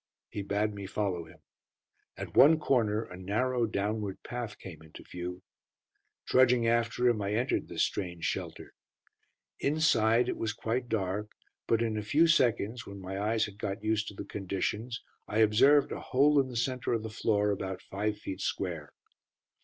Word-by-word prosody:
He 105 - -4
bade 105 +2 -1
me 100 -1 -7
follow 95 -4 -2
him. 80 - -17 0.8
At - - -7
one 155 +4 +8
corner 115 -8 +1
a 90 - -11
narrow, 115 +6 0
downward 105 -1 -3
path 120 -3 -5
came 85 -5 -10
into 80 -1 -13
view. 90 +1 -7 0.8
Trudging 125 -2 +4
after 120 +1 +2
him, 115 -3 +2
I 100 +1 -1
entered 125 +4 0
this - - 0
strange 85 -4 -3
shelter. - - -4 0.9
Inside 125 -6 +3
it - - -2
was 110 -2 -2
quite 120 +3 -2
dark, 105 0 -1 0.4
but 115 0 +2
in 110 -2 -1
a - - -1
few 145 +11 +3
seconds, 120 -7 +2
when 100 0 -8
my 95 +1 -5
eyes 110 +2 +1
had 105 -1 -11
got 100 0 -4
used 110 0 0
to 100 - -7
the - - -6
conditions, 105 +4 -3 0.2
I 105 - -3
observed 115 +7 +5
a - - -4
hole 145 +3 +3
in 135 - +2
the 125 - -8
centre 125 +1 -1
of 115 -2 -1
the 110 - -5
floor 105 -1 +1
about 95 -1 -4
five 105 +2 -2
feet 95 0 -6
square. 85 -8 -3
110 Hz, 170 wpm, -30 LUFS, 100-120 Hz, 0.9 s, one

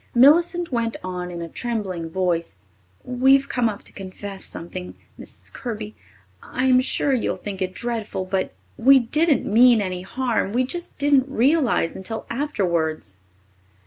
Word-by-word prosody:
Millicent 340 +6 +5
went 230 -2 -1
on 180 -1 -4
in 170 -1 -5
a - - -5
trembling 190 -5 -4
voice. 170 - -1 0.5
"We've 265 +2 +3
come 240 -2 +1
up 205 - -7
to - - -12
confess 195 0 -8
something, 180 +2 -7 0.2
Mrs. - - -6
Kirby. 215 -3 -5 0.5
I'm 255 -1 +2
sure 275 +1 0
you'll 250 - 0
think 200 -2 -7
it 185 0 -2
dreadful, 225 -5 -3
but 185 0 -1 0.3
we 270 +4 +7
didn't 295 +4 +2
mean 235 +2 +6
any 185 -3 -2
harm. 235 0 -1
We 250 +2 +2
just 345 +7 -5
didn't 280 -2 +3
realize, 265 - +2
until 220 +4 -5
afterwards." 170 - -1
225 Hz, 145 wpm, -23 LUFS, 185-260 Hz, 0.5 s, we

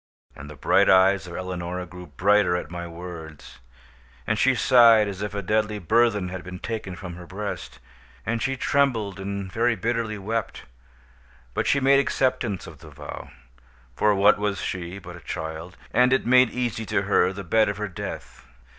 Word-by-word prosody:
And 75 - -10
the 75 - -10
bright - - +3
eyes 95 0 +4
of 85 - -8
Eleonora 90 0 -4
grew 90 0 -11
brighter 105 -2 +2
at 90 - -4
my 85 0 -5
words; 85 -5 -10 0.7
and 105 0 0
she 135 0 +4
sighed 115 -3 +6
as 100 -1 -6
if 105 0 -4
a 100 - -3
deadly 105 +2 0
burthen 105 0 +2
had 95 0 -6
been 90 0 -8
taken 110 -2 -5
from 90 0 -8
her 90 -1 -11
breast; 95 -8 -6 0.5
and 115 +1 -1
she 135 0 -1
trembled 120 -9 0
and 100 -1 -5
very 115 +3 +1
bitterly 115 +1 -2
wept; 110 +2 -4 0.9
but - - -1
she 140 - +3
made 140 +1 +5
acceptance 125 -8 0
of 80 -3 -12
the 80 - -13
vow, 70 - -9 0.7
(for 105 +6 +3
what 100 +1 +5
was 105 -2 -1
she 90 0 -4
but 90 -2 -10
a - - -11
child?) 80 +2 -6 0.2
and 125 +1 +4
it 130 - +1
made 125 0 +5
easy 120 -2 -3
to 100 - 0
her 95 -2 +3
the 100 +1 -7
bed 110 +5 +2
of 100 - -3
her 105 0 -3
death. 65 -8 -8
100 Hz, 180 wpm, -24 LUFS, 90-115 Hz, 0.9 s, sighed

